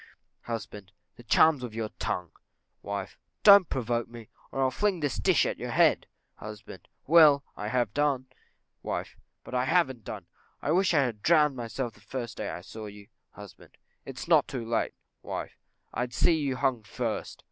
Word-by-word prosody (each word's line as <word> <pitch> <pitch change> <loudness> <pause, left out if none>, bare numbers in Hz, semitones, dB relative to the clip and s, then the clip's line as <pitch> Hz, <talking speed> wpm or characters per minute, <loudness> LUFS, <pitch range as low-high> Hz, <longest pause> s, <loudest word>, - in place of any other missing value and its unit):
Husband. 105 -4 -6 0.2
The - - -13
charms 150 +4 +4
of 115 -3 -6
your 110 -1 -3
tongue. 90 -2 -3 0.5
Wife. 100 -1 -5 0.2
Don't 200 -4 +8
provoke 120 -2 -1
me, 115 -2 -11 0.2
or 135 - 0
I'll 130 - +2
fling 200 +4 0
this 145 -5 -1
dish - - +3
at - - -3
you - - -4
head. - - +3 0.3
Husband. 105 0 -10 0.2
Well, 150 -3 +7
I 105 - -5
have 120 -2 0
done. 140 -3 +1 0.6
Wife. - - -4 0.3
But - - -11
I 125 0 +1
haven't 130 -7 +1
done: - - -7 0.3
I 145 - -1
wish 180 0 +3
I 145 - +5
had 115 -5 -3
drowned 150 -2 +4
myself 120 0 -4
the 105 - -21
first 120 +1 -6
day 105 - -3
I 80 +3 -6
saw 110 +3 -9
you. 105 +1 -12 0.2
Husband. 105 -1 -14 0.3
It's - - -8
not - - +5
too 125 -4 -5
late. 115 0 -1 0.3
Wife. - - -6 0.4
I'd 120 -1 -3
see 175 - +4
you 145 -5 0
hung 130 -3 0
first. 110 +1 -4
125 Hz, 175 wpm, -28 LUFS, 110-145 Hz, 0.6 s, Don't